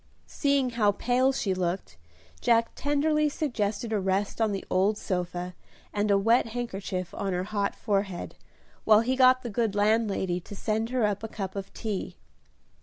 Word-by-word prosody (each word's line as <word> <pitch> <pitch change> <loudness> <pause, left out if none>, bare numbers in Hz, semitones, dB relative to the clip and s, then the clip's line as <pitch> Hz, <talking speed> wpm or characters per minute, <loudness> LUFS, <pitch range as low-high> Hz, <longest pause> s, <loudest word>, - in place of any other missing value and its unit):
Seeing 280 -3 +1
how 210 -4 +2
pale 250 +5 +2
she 205 -7 -1
looked, 180 - -2 0.4
Jack 230 -1 +3
tenderly 300 +1 +1
suggested 225 -6 -2
a 210 - +2
rest 195 +3 -1
on 220 -2 +2
the 195 - -4
old 200 +3 +2
sofa, 180 -1 -3 0.4
and 210 0 0
a 200 - +5
wet 225 +4 +3
handkerchief 200 -6 -4
on 195 -2 -2
her 180 0 -1
hot 200 0 -1
forehead, 195 -4 -2 0.5
while 215 0 +6
he 255 +3 0
got 255 0 +5
the 240 - -4
good 220 -1 0
landlady 205 -4 +1
to 190 +3 -10
send 220 +2 -1
her 250 -3 +1
up 205 -1 -1
a 225 - -4
cup 195 -3 -5
of 195 -1 -5
tea. 215 -4 -4
210 Hz, 170 wpm, -27 LUFS, 195-240 Hz, 0.5 s, while